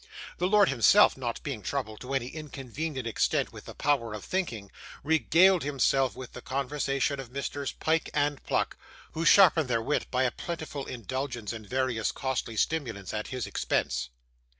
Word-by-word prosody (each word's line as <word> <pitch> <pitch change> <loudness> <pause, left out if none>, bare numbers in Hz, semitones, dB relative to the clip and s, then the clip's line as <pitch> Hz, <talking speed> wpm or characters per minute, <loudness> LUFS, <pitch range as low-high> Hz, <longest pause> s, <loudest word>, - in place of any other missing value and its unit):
The 180 - +2
lord 205 0 +5
himself, 140 - +6
not 120 -3 -4
being 135 -7 -4
troubled 110 0 -3
to 130 +2 -4
any 125 -2 -1
inconvenient 140 -2 -5
extent 115 - 0
with - - -11
the - - -9
power 135 -7 0
of 105 - -8
thinking, 120 - -3 0.3
regaled 170 +4 +4
himself 135 -2 +1
with 130 -2 -9
the - - -8
conversation 140 +1 -1
of 130 -3 -7
Messrs 140 +1 -3
Pyke 160 +1 0
and 145 -1 0
Pluck, - - -1 0.3
who 165 +1 -3
sharpened 165 -7 +6
their 115 -2 +2
wit 150 - 0
by 130 0 +1
a 125 - +2
plentiful 160 -4 -5
indulgence 125 -1 -4
in 110 -2 -8
various 130 -1 0
costly 130 -4 -3
stimulants 115 -10 -1
at 110 0 -3
his 130 -3 -4
expense. 65 0 -1
135 Hz, 165 wpm, -28 LUFS, 120-150 Hz, 0.3 s, himself